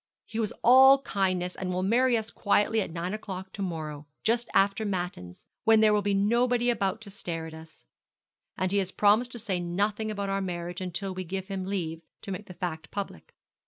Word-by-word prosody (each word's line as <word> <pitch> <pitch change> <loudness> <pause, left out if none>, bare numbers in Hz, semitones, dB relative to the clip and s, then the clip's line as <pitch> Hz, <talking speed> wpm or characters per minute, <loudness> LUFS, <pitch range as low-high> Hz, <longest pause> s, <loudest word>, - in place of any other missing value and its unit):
He 225 - -5
was 220 -1 0
all 265 +3 +8
kindness, 185 -6 0
and 185 -1 -3
will 180 +1 -1
marry 240 +4 +3
us 220 0 -4
quietly 210 +2 +2
at - - -3
nine 170 +3 -4
o'clock 190 -3 -6
to 200 - -6
morrow, 155 -5 -4 0.2
just 235 +1 +1
after 200 +2 +3
Matins, 175 - -4 0.2
when 225 -1 +6
there 215 -1 +5
will 210 - +3
be 200 0 +1
nobody 240 +4 +2
about 200 -1 -1
to 205 -2 -8
stare 165 -4 -4
at 160 - -9
us; 160 - -13 0.7
and 185 0 0
he 200 - +3
has 190 -1 -2
promised 215 +4 +3
to - - -6
say 200 -5 -2
nothing 205 +5 -1
about 200 -2 -3
our 195 0 0
marriage 175 -1 -4
until 185 +2 -3
we 185 0 -4
give 190 +2 -5
him 190 -1 -3
leave 165 -5 -3 0.2
to 195 - -6
make 195 +2 -6
the 180 - -10
fact 160 -3 -4
public.' 200 - -6
195 Hz, 205 wpm, -28 LUFS, 180-215 Hz, 0.7 s, all